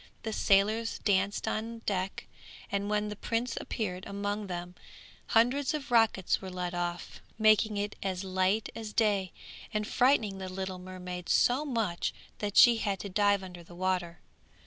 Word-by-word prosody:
The 220 -1 -3
sailors 215 +4 +2
danced 200 0 +1
on 225 +1 -3
deck, 190 -1 -2 0.5
and 200 0 -1
when 210 0 0
the 210 - -5
prince 230 +3 -2
appeared 185 -4 -3
among 205 +1 -3
them 175 -1 -5 0.5
hundreds 255 +6 +3
of 275 -3 -6
rockets 225 -6 +3
were 190 - -6
let 180 -1 -4
off 175 0 -4 0.2
making 215 -1 +4
it 205 +1 -2
as 190 -1 -2
light 190 +3 +1
as 220 -2 -6
day, 200 -5 +2 0.4
and 215 -1 -1
frightening 225 -6 +2
the 190 -1 -5
little 190 0 -4
mermaid 180 -1 -7
so 260 +5 +3
much 225 -10 -1 0.2
that 205 -1 -2
she 240 -1 +8
had 200 -3 -1
to 200 - -5
dive 205 0 +2
under 180 -2 -9
the 170 +1 -14
water. 180 -2 -1
200 Hz, 160 wpm, -30 LUFS, 185-220 Hz, 0.5 s, she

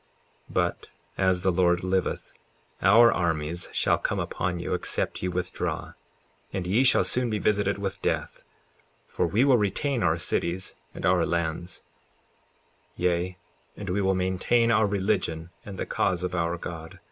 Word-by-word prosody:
54:10 - - -13
But, - - -1 0.3
as 95 -1 +1
the 95 - +3
Lord 90 0 +2
liveth, 95 0 -1 0.5
our 115 +3 +7
armies 85 -1 -1
shall - - +2
come - - -1
upon 90 -1 -2
you 85 - -3
except - - 0
ye 90 - -1
withdraw, 90 0 -3 0.6
and 95 -2 -3
ye 105 +8 +3
shall 135 - +5
soon 125 -1 +3
be 105 - -1
visited 100 -1 +1
with 100 -1 -4
death, - - -2 0.6
for - - -1
we 105 +9 +2
will 130 -4 +5
retain 115 +6 0
our 80 -1 +2
cities 85 +2 -1 0.2
and - - -5
our 90 0 +3
lands; 85 +1 -2 1.1
yea, 90 +1 -1 0.4
and 100 -3 -5
we 100 +2 0
will 95 0 +2
maintain 95 +6 +1
our 110 -1 +4
religion 95 -5 -1
and 100 -2 -8
the - - -3
cause 90 -1 0
of 90 0 -2
our 85 0 -1
God. 80 -1 -8
90 Hz, 160 wpm, -26 LUFS, 85-100 Hz, 1.1 s, our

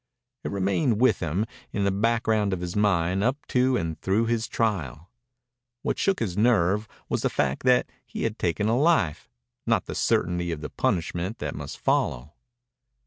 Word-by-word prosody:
It - - -3
remained 100 +5 +1
with 130 -2 +4
him, 90 +5 -1 0.3
in 100 - -1
the 100 - +2
background 110 -1 +1
of 95 - -2
his 90 0 -4
mind, 95 -2 +2
up 130 +5 -1
to 125 0 +3
and 80 -2 -4
through 100 +4 +1
his 115 -1 0
trial. 85 - -2 0.7
What - - -1
shook 195 -7 +1
his 95 -6 -1
nerve 105 -2 +2 0.2
was - - -1
the - - +1
fact 70 0 -1
that 125 -1 +4 0.2
he - - -6
had 115 -1 -2
taken 90 +5 0
a 115 - +2
life, 145 - +2 0.4
not - - +2
the - - -5
certainty 85 0 0
of 80 -2 -4
the 75 - -6
punishment 85 +4 -1
that 75 -1 -4
must 70 -1 -7
follow. 65 +5 0
100 Hz, 175 wpm, -26 LUFS, 85-115 Hz, 0.7 s, with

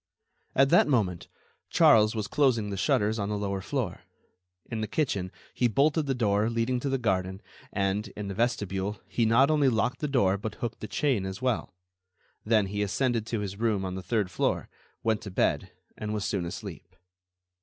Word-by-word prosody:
At 135 +1 +5
that 175 - +5
moment, 105 - 0 0.4
Charles 110 0 +5
was 110 -2 -1
closing 120 -8 +2
the - - -2
shutters 110 0 +1
on 100 0 -2
the 105 - -1
lower 100 -1 -2
floor. 120 -2 -3 0.6
In 115 -2 -4
the 110 - -2
kitchen, 100 -12 -1 0.2
he 125 - +2
bolted 145 +6 +2
the 135 - 0
door 105 -2 +2
leading 115 +2 0
to 140 - -2
the 135 - +1
garden, 95 -5 -1 0.3
and, 100 +2 0
in 105 -1 -4
the 100 - -4
vestibule, 105 -3 -1
he 115 -2 +1
not 130 +6 +5
only 145 -3 +4
locked 125 +2 0
the 150 - -1
door 100 -9 +2
but 105 +1 -5
hooked 120 -2 -5
the 110 - -6
chain 130 -4 0
as 95 0 -5
well. 125 -7 -1 0.7
Then 110 -2 +3
he 100 +1 -3
ascended 115 +2 0
to 115 -3 -2
his 100 0 -5
room 110 -4 +1
on 95 - -3
the 95 - -5
third 105 -1 -1
floor, - - -1 0.3
went 110 -2 +1
to 100 - -7
bed, 95 - 0 0.2
and 105 0 -4
was 105 - -2
soon 95 -4 -1
asleep. 85 - -8
110 Hz, 190 wpm, -28 LUFS, 100-125 Hz, 0.7 s, At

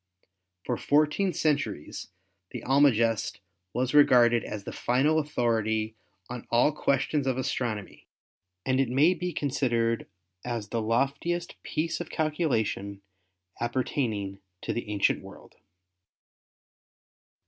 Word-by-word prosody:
For - - -1
fourteen 155 +6 +2
centuries 145 - -1 0.4
the - - -7
Almagest 115 -5 +3 0.3
was 130 +5 -1
regarded 120 -6 +6
as 105 -2 -6
the - - -6
final 145 +6 +2
authority 110 -6 0 0.3
on 125 -1 -7
all 120 +5 +4
ques 140 -2 +1
tions 145 -3 -1
of 130 -1 +1
astronomy 115 -5 -3 0.6
and 130 0 +2
it 135 -3 +2
may 145 +8 +4
be 180 +1 -3
considered 120 -6 0 0.4
as 115 -4 -4
the 115 - -1
loftiest 140 +10 -1
piece 165 +2 -2
of 175 - -6
calculation 115 - -1 0.6
appertaining 115 -5 -2 0.2
to - - -2
the 120 -2 -4
Ancient 105 -2 +1
World. - - -14
125 Hz, 115 wpm, -28 LUFS, 115-145 Hz, 0.6 s, regarded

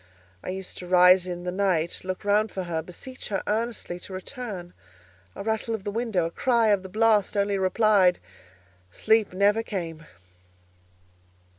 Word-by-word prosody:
I - - -5
used 190 0 -6
to 180 - -8
rise 180 0 +6
in 175 -1 -5
the 180 - -3
night, 180 -4 0
look 185 +2 -5
round 210 +2 +3
for 190 - -4
her, 165 -2 -2
beseech 185 +10 -9
her 195 -2 -2
earnestly 220 -5 -2
to 190 - -10
return. 185 -3 -7 0.6
A - - -6
rattle 220 +1 -1
of 205 - -8
the 205 - -3
window, 220 -6 0
a 165 - -3
cry 235 +1 +2
of 200 -2 +3
the 190 - -9
blast 215 0 +2
only 200 0 +1
replied—Sleep 180 - 0
never 200 +4 +2
came! 165 -7 -6
190 Hz, 155 wpm, -26 LUFS, 175-215 Hz, 0.6 s, rise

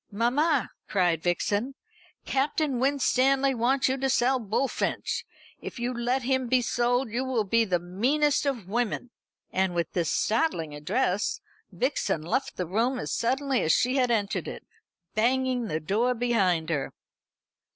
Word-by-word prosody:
"Mamma," 250 +5 +1 0.2
cried 175 -5 +2
Vixen, 205 +9 -1 0.5
"Captain 275 -1 0
Winstanley 270 0 +2
wants 255 +3 +2
you 265 +1 0
to 270 0 0
sell 260 0 +2
Bullfinch. 230 +4 -1 0.4
If - - -7
you 240 +1 -2
let 245 +2 -1
him 260 0 0
be 255 +1 +3
sold, 245 0 0
you 245 +3 -1
will 255 -4 0
be 230 +3 +2
the 180 -4 +1
meanest 265 - +1
of 240 -9 -2
women." 240 +3 -2 0.4
And 190 -2 +1
with 170 -1 -1
this 170 -3 0
startling 210 - 0
address 180 +7 -1 0.3
Vixen 205 - -1
left 220 - -1
the 180 - -1
room 230 +9 0
as - - -3
suddenly 265 +2 0
as 160 - +3
she 255 +3 +2
had 250 -2 +2
entered 215 -3 0
it, - - -7 0.5
banging 250 +1 +1
the 155 -5 -2
door 220 +10 +1
behind 190 -9 +1
her. 145 -4 -2
240 Hz, 150 wpm, -27 LUFS, 195-265 Hz, 0.5 s, be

